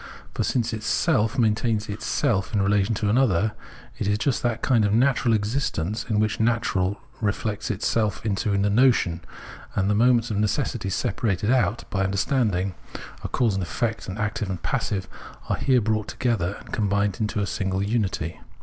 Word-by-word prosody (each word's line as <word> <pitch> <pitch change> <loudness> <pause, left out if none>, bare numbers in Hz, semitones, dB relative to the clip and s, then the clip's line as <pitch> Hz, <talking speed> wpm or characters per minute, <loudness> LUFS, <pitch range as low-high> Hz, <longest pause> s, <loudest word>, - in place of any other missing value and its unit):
For - - -1
since 120 -2 0
itself 110 +1 +1
main 110 -4 +4
tains 110 -1 -1
itself 105 0 -1
in 100 - +3
relation 100 +2 +2
to 105 0 -1
another, 110 -5 +3 0.5
it - - -1
is 105 0 +2
just 130 +3 0
that 120 -1 -1
kind 120 -5 +3
of 100 - +2
natural 120 0 +3
existence 105 - -2
in 105 -2 +2
which 110 0 0
nature 110 -4 +1 0.3
reflects 105 +1 -2
itself 110 +1 0
into 105 +1 0
the 100 0 +2
notion, 110 -8 +3 0.5
and 100 +1 +1
the - - +3
moments 120 +1 +3
of 105 - -1
necessity 105 -1 0
separated 100 +2 0
out 120 -3 +1
[by 95 -1 0
Understanding] 100 -2 0 0.3
— - - -14
a - - -2
cause 120 -5 +1
and 95 - -1
an 90 - -3
effect, 115 -2 -2
an 95 - -5
active 105 -1 -2
and 95 - -2
a - - -24
passive 100 -1 -1 0.2
— - - -19
are - - +1
here 130 -3 +3
brought 110 -1 0
together 105 -7 -1
and - - -14
com 105 -2 0
bined 100 -1 0
into 105 -1 -1
a 100 - +1
single 95 0 -1
unity. 100 -7 -1
105 Hz, 185 wpm, -24 LUFS, 100-115 Hz, 0.5 s, main